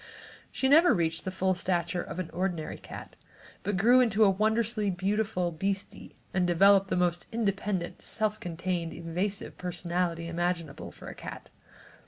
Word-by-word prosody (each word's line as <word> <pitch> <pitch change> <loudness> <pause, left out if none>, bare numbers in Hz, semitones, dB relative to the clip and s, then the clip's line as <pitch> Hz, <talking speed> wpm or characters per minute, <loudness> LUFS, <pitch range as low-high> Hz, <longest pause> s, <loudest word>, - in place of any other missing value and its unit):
She 265 - 0
never 320 +6 +6
reached 165 -1 -1
the - - -1
full 185 0 +1
stature 175 -1 -1
of - - -7
an 185 -3 -4
ordinary 175 -3 -2
cat, - - -10 0.5
but 200 0 -1
grew 240 +6 +6
into 225 -4 +4
a 200 - +6
wondrously 215 +1 +1
beautiful 195 +1 0
little 170 -2 -2
beastie 195 +1 -3 0.2
and 180 -1 +2
developed 195 +3 +5
the - - +1
most 175 -1 0
independent, 200 -5 -1
self 215 -1 -1
contained, 170 0 -3
evasive 180 +5 -3
personality 175 -1 -2
imaginable, 170 -2 -2
for - - -12
a - - -6
cat. - - -9
185 Hz, 155 wpm, -29 LUFS, 175-205 Hz, 0.5 s, never